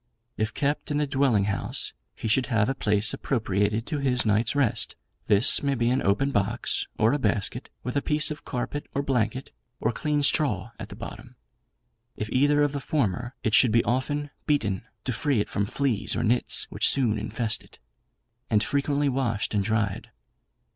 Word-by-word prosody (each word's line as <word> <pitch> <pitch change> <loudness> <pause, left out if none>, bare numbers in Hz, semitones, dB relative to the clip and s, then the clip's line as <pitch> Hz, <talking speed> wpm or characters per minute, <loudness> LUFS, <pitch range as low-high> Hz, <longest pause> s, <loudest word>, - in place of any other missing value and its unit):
If 110 0 -1
kept 145 +1 -1
in 145 - 0
the 150 - +1
dwelling 135 -7 +2
house 100 0 -2 0.2
he - - -5
should 125 +4 +2
have 115 -5 +2
a 135 - 0
place 105 -5 +2
appropriated 105 -2 -1
to 150 - -3
his 130 -3 +3
night's 110 +4 +2
rest; 135 -7 0 0.3
this 105 +6 +4
may 140 -1 0
be 120 -1 +1
an 130 - +1
open 120 +9 +1
box, 110 +1 0
or 110 +4 +3
a 145 - 0
basket, 105 -4 -1
with 125 +2 -4
a 140 - +2
piece 155 +1 +3
of 150 - -7
carpet 135 +3 -4
or 140 - 0
blanket, 130 -1 -1 0.3
or 110 - +1
clean 150 +4 -1
straw 115 -8 +2
at - - -7
the - - -9
bottom: - - -9 0.8
if 105 - -4
either 145 +3 +3
of 145 - +1
the 140 - -3
former 125 -4 -1
it 110 - 0
should 125 -1 +6
be 115 +1 +3
often 145 +4 -1 0.2
beaten, 110 - 0 0.2
to 125 - -1
free 140 0 0
it 105 - -2
from 100 0 -1
fleas 130 -3 0
or - - -1
nits, 120 +3 +2
which - - +3
soon 115 -6 +3
infest 110 +1 -2
it, - - -17 0.7
and 110 -1 +3
frequently 140 +2 0
washed 120 -6 -1
and 100 -2 +1
dried. 105 -2 -1
120 Hz, 185 wpm, -26 LUFS, 105-140 Hz, 0.8 s, should